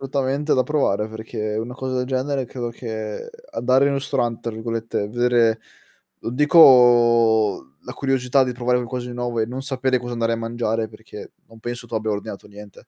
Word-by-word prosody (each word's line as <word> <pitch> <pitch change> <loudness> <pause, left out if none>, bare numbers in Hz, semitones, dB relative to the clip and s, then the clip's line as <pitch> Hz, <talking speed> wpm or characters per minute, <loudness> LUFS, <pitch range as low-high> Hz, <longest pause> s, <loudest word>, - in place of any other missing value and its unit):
Assolutamente 140 +2 0
da 130 - +3
provare 120 -9 0
perché 110 -1 -5
una 120 +3 -4
cosa 130 -1 -2
genere 130 0 -1
credo 120 -1 -5
che 110 - -6 0.2
"andare 130 +2 +2
in 140 - +2
un 140 - 0
ristorante" 120 -4 -2
tra 115 - -4
virgolette, 115 -2 -3
vedere 120 -1 +2 0.6
non 115 - -5
dico 120 - +5
la 125 - -8
curiosità 135 -1 +1
di 125 -1 -1
provare 125 0 0
qualcosa 125 0 -4
di - - -7
nuovo 120 -1 -2
e 110 - +1
non 125 +3 -5
sapere 130 -1 0
cosa 120 0 -7
andare 115 0 0
a 115 - 0
mangiare 115 -1 -2
perché 110 -1 -12
non 115 0 -17
penso 120 +1 -6
tu 115 - -8
abbia 110 0 -1
ordinato 105 0 -6
niente 105 +3 -14
120 Hz, 180 wpm, -22 LUFS, 110-130 Hz, 0.6 s, dico